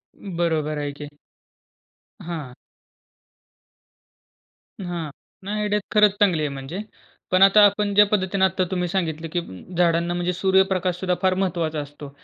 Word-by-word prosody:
बरोबर 165 Hz, -5 st, -2 dB
आहे 145 Hz, -1 st, -3 dB
की. 145 Hz, 0 st, -9 dB, 1.1 s
हां. 160 Hz, -7 st, -6 dB, 2.3 s
हां, 170 Hz, -4 st, -4 dB, 0.3 s
नाही, 210 Hz, +2 st, -3 dB
आयडिया 210 Hz, 0 st, +1 dB
खरंच 210 Hz, -1 st, +5 dB
चांगली 180 Hz, -6 st, +3 dB
आहे 150 Hz, -, -1 dB
म्हणजे. 135 Hz, +5 st, -7 dB, 0.5 s
पण 185 Hz, +1 st, +3 dB
आता 195 Hz, +2 st, +7 dB
आपण 205 Hz, 0 st, +1 dB
ज्या 210 Hz, +1 st, +7 dB
पद्धतीने 195 Hz, -1 st, +1 dB
आत्ता 190 Hz, 0 st, 0 dB
तुम्ही 180 Hz, -1 st, -1 dB
सांगितलं 165 Hz, -3 st, -2 dB
की 175 Hz, -, 0 dB
उम्म, 170 Hz, -, -10 dB
झाडांना 170 Hz, 0 st, +2 dB
म्हणजे 175 Hz, +1 st, -1 dB
सूर्यप्रकाश 190 Hz, -1 st, +2 dB
सुद्धा 180 Hz, -1 st, 0 dB
फार 185 Hz, -1 st, +3 dB
महत्वाचा 170 Hz, -5 st, -1 dB
असतो. 145 Hz, 0 st, -8 dB
180 Hz, 135 wpm, -23 LUFS, 160-190 Hz, 2.3 s, आता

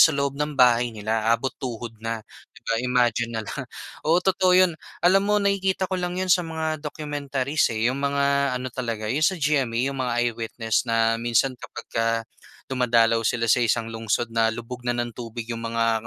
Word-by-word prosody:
sa 160 Hz, -3 st, +7 dB
loob 140 Hz, -1 st, 0 dB
ng 150 Hz, +1 st, -3 dB
bahay 120 Hz, -2 st, +5 dB
nila, 110 Hz, +1 st, -1 dB
abot 115 Hz, +3 st, +1 dB
tuhod 120 Hz, -3 st, -5 dB
na, 115 Hz, -1 st, -4 dB, 0.3 s
'di -, -, -14 dB
ba? 115 Hz, -, 0 dB
Imagine 120 Hz, -2 st, +1 dB
na -, -, -1 dB
lang. -, -, -5 dB, 0.4 s
Oo, 160 Hz, +2 st, +4 dB
totoo 185 Hz, -1 st, +3 dB
'yon. 185 Hz, -2 st, +5 dB, 0.3 s
Alam 190 Hz, +3 st, +5 dB
mo 210 Hz, -, +2 dB
nakikita 195 Hz, -1 st, 0 dB
ko 185 Hz, -, 0 dB
lang 180 Hz, 0 st, -2 dB
'yon 185 Hz, 0 st, -1 dB
sa 180 Hz, -1 st, +4 dB
mga 160 Hz, -1 st, -2 dB
documentaries, 145 Hz, -1 st, -1 dB
eh. 115 Hz, +3 st, +1 dB
'Yong 130 Hz, -, -3 dB
mga 140 Hz, 0 st, +1 dB, 0.3 s
ano 125 Hz, 0 st, -4 dB
talaga 115 Hz, -4 st, -3 dB
'yong 150 Hz, +5 st, +2 dB
sa 190 Hz, -, +2 dB
GMA, 140 Hz, -6 st, 0 dB
'yong 135 Hz, -, -6 dB
mga 125 Hz, -2 st, -1 dB, 0.2 s
I-Witness 115 Hz, 0 st, -2 dB
na 115 Hz, 0 st, +2 dB
minsan 120 Hz, +2 st, +1 dB
kapag -, -, -9 dB
ka 115 Hz, 0 st, 0 dB, 0.6 s
dumadalaw 115 Hz, -3 st, +3 dB
sila 115 Hz, -2 st, +1 dB
sa 125 Hz, -, +5 dB
isang 115 Hz, -1 st, +1 dB
lungsod 115 Hz, +1 st, -1 dB
na 115 Hz, 0 st, +2 dB
lubog 120 Hz, +1 st, -8 dB
na 120 Hz, -, +1 dB
ng 120 Hz, 0 st, -2 dB
tubig 115 Hz, 0 st, -7 dB
'yong 115 Hz, -, -3 dB
mga 115 Hz, -1 st, 0 dB
125 Hz, 195 wpm, -24 LUFS, 115-150 Hz, 0.6 s, sa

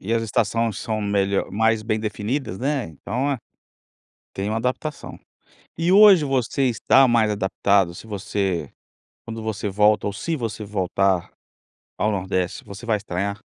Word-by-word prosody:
E 110 Hz, +4 st, -3 dB
as 115 Hz, 0 st, +1 dB
estações 115 Hz, 0 st, 0 dB
são 110 Hz, -1 st, -3 dB
melho 100 Hz, -1 st, 0 dB
mais 110 Hz, +1 st, +2 dB
bem 110 Hz, -1 st, -1 dB
definidas, 110 Hz, 0 st, -3 dB
né, 135 Hz, -1 st, -1 dB
então 115 Hz, -, -3 dB
é, 135 Hz, -, -1 dB, 0.9 s
tem 100 Hz, +2 st, -3 dB
uma 110 Hz, -, -1 dB
adaptação. 130 Hz, +6 st, -3 dB, 0.6 s
E 170 Hz, +2 st, +2 dB
hoje 200 Hz, -6 st, +8 dB
você 135 Hz, 0 st, 0 dB
está 130 Hz, +2 st, +4 dB
mais 115 Hz, -3 st, +3 dB
adaptado 100 Hz, -2 st, +1 dB
se 110 Hz, -, -11 dB
você, 100 Hz, -3 st, -2 dB, 0.6 s
quando 115 Hz, -1 st, -6 dB
você 110 Hz, -2 st, -3 dB
volta 105 Hz, +1 st, +3 dB
ou 100 Hz, -, -3 dB
se 160 Hz, +10 st, -3 dB
você 110 Hz, -5 st, -4 dB
voltar 95 Hz, -2 st, 0 dB, 0.7 s
ao 110 Hz, -, +1 dB
nordeste 95 Hz, -2 st, -2 dB
você 105 Hz, +4 st, -10 dB
vai 110 Hz, -2 st, +2 dB
estranhar? 100 Hz, +1 st, -3 dB
110 Hz, 150 wpm, -23 LUFS, 100-120 Hz, 0.9 s, hoje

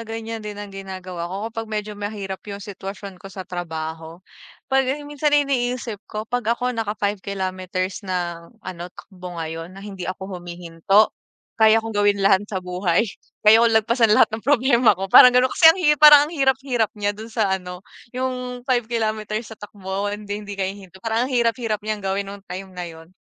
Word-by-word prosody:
ganiyan 225 Hz, 0 st, -5 dB
din 210 Hz, -1 st, -7 dB
ang 205 Hz, -1 st, -8 dB
ginagawa 185 Hz, -3 st, -6 dB
ko 190 Hz, -, -5 dB, 0.2 s
kapag 225 Hz, -1 st, -5 dB
medyo 210 Hz, -1 st, -3 dB
mahirap 205 Hz, -2 st, -5 dB
yung 200 Hz, -, -5 dB
sitwasyon 195 Hz, -2 st, -8 dB
ko 195 Hz, -, -10 dB
sa 190 Hz, 0 st, -8 dB
trabaho. 165 Hz, -1 st, -6 dB, 0.5 s
'Pag 270 Hz, +1 st, +2 dB
minsan 295 Hz, +1 st, -1 dB
ang 290 Hz, -, +3 dB
iniisip 245 Hz, -5 st, -2 dB
ko 215 Hz, 0 st, -5 dB
'pag 235 Hz, 0 st, -1 dB
ako 250 Hz, 0 st, -1 dB
naka 220 Hz, -2 st, -3 dB
5 205 Hz, -1 st, -1 dB
kilometers 185 Hz, -1 st, -3 dB
na 175 Hz, -4 st, -4 dB, 0.2 s
ano, 180 Hz, -1 st, -6 dB
takbo 180 Hz, -1 st, -11 dB
ngayon 165 Hz, +2 st, -6 dB
na 195 Hz, -, -10 dB
hindi 195 Hz, -3 st, -6 dB
ako 185 Hz, -1 st, -6 dB
humihinto, 175 Hz, +4 st, +1 dB, 0.5 s
kaya 220 Hz, 0 st, +7 dB
kong 225 Hz, -, -4 dB
gawin 205 Hz, -1 st, +2 dB
lahat 190 Hz, 0 st, +5 dB
sa 195 Hz, -, -4 dB
buhay. 180 Hz, +2 st, +1 dB, 0.4 s
Kaya 220 Hz, +2 st, +8 dB
ko 235 Hz, -, +5 dB
lagpasan 230 Hz, +1 st, +3 dB
lahat -, -, +5 dB
ng 220 Hz, -, -3 dB
problema 250 Hz, -5 st, +4 dB
ko 195 Hz, +1 st, -5 dB
parang 250 Hz, -, +11 dB
gano'n. 250 Hz, +1 st, +3 dB
Kasi 320 Hz, -, +7 dB
ang 325 Hz, -, +6 dB
hirap 300 Hz, -6 st, +2 dB
parang 300 Hz, -1 st, +10 dB
ang 310 Hz, -, -8 dB
hirap 270 Hz, -4 st, +2 dB
hirap 245 Hz, -5 st, +1 dB
niya 205 Hz, 0 st, 0 dB
do'n 220 Hz, +2 st, -9 dB
sa 220 Hz, -4 st, 0 dB
ano, 180 Hz, 0 st, -5 dB, 0.3 s
yung 250 Hz, -1 st, -3 dB
5 245 Hz, -3 st, 0 dB
kilometers 220 Hz, -1 st, -2 dB
sa -, -, -10 dB
takbo. 200 Hz, -1 st, -4 dB
Hindi 205 Hz, 0 st, -5 dB
hindi 205 Hz, -1 st, -8 dB
ka 195 Hz, -, -1 dB
hihinto, 190 Hz, -1 st, -7 dB
parang 225 Hz, +3 st, 0 dB
ang -, -, -6 dB
hirap-hirap 230 Hz, -3 st, 0 dB
niyang 215 Hz, -1 st, -2 dB
gawin 195 Hz, +1 st, -1 dB
nung 200 Hz, -, -10 dB
time 190 Hz, +1 st, -7 dB
na 180 Hz, -1 st, -6 dB
'yon. 165 Hz, +2 st, -13 dB
205 Hz, 195 wpm, -22 LUFS, 185-230 Hz, 0.5 s, parang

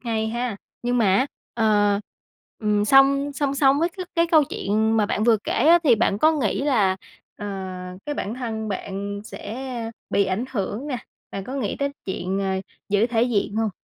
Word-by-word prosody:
Hay 220 Hz, -2 st, -1 dB
ha? 240 Hz, -2 st, -2 dB, 0.3 s
Nhưng 245 Hz, 0 st, +1 dB
mà 230 Hz, -, +3 dB
á, 260 Hz, -, +2 dB, 0.3 s
ờ, 205 Hz, -3 st, +3 dB, 0.6 s
ừm, 210 Hz, -1 st, +1 dB
song 275 Hz, +3 st, +5 dB
song 280 Hz, -1 st, -1 dB
song 275 Hz, 0 st, +4 dB
với 335 Hz, -, +2 dB
cái 365 Hz, 0 st, -7 dB
cái 335 Hz, 0 st, +3 dB
câu 315 Hz, -3 st, +5 dB
chuyện 220 Hz, -2 st, 0 dB
mà 210 Hz, -2 st, +3 dB
bạn 210 Hz, -, 0 dB
vừa 230 Hz, -1 st, +5 dB
kể -, -, -1 dB
á, 335 Hz, +3 st, +6 dB
thì 250 Hz, -, +6 dB
bạn 205 Hz, -2 st, +1 dB
có 315 Hz, +7 st, +5 dB
nghĩ 265 Hz, -9 st, 0 dB
là, 210 Hz, -10 st, +2 dB, 0.4 s
ờ, 205 Hz, -, -6 dB, 0.6 s
cái 295 Hz, -, -2 dB
bản 220 Hz, -4 st, -3 dB
thân 225 Hz, -3 st, -4 dB
bạn 200 Hz, +1 st, -4 dB
sẽ 235 Hz, +1 st, -6 dB, 0.2 s
bị 200 Hz, -, +3 dB
ảnh 190 Hz, +5 st, -1 dB
hưởng 215 Hz, +3 st, -3 dB
nè, 275 Hz, -4 st, -2 dB, 0.3 s
bạn 195 Hz, -, -5 dB
có 255 Hz, -, -6 dB
nghĩ 255 Hz, -8 st, -2 dB
tới 280 Hz, 0 st, 0 dB
chuyện, 190 Hz, 0 st, -2 dB
ờ, 195 Hz, -1 st, 0 dB, 0.3 s
giữ 205 Hz, +3 st, +3 dB
thể 230 Hz, -2 st, +1 dB
diện 215 Hz, -3 st, 0 dB
hông? 220 Hz, -2 st, +1 dB
225 Hz, 195 wpm, -23 LUFS, 205-270 Hz, 0.6 s, á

